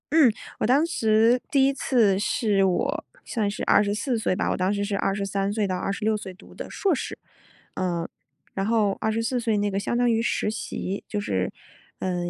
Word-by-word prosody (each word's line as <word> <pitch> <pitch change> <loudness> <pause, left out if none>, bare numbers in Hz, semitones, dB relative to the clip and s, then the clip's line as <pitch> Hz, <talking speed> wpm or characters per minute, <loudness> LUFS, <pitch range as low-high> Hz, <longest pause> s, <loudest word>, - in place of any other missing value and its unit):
嗯， 310 -6 +7 0.3
我 - - +1
当 275 +6 +4
时 225 -5 +3
第 275 -2 +4
一 275 - +3
次 225 -8 +2
是 205 -1 +2
我 280 - 0 0.2
算 215 -5 -1
是 205 - -5
24 210 +4 +2
岁 200 - 0
吧， 200 - -1
我 - - -1
当 185 +2 +1
时 200 0 -1
是 200 -1 -1
23 195 0 -1
岁 210 -1 0
到 185 -2 -1
26 210 +3 -1
岁 190 -3 -8
读 185 - -16
的 - - -7
硕 390 -3 +1
士， 270 - -4 0.6
呃， 175 -3 -2 0.4
然 195 - -1
后 215 -2 +2
24 225 +3 0
岁 225 -2 0
那 205 0 0
个 195 - 0
相 235 - -1
当 245 -1 +3
于 225 0 +2
实 230 - 0
习， 200 -2 -4
就 210 - -2
是， 95 - -1 0.5
嗯， 180 -1 -2
210 Hz, 185 characters per minute, -25 LUFS, 195-235 Hz, 0.6 s, 嗯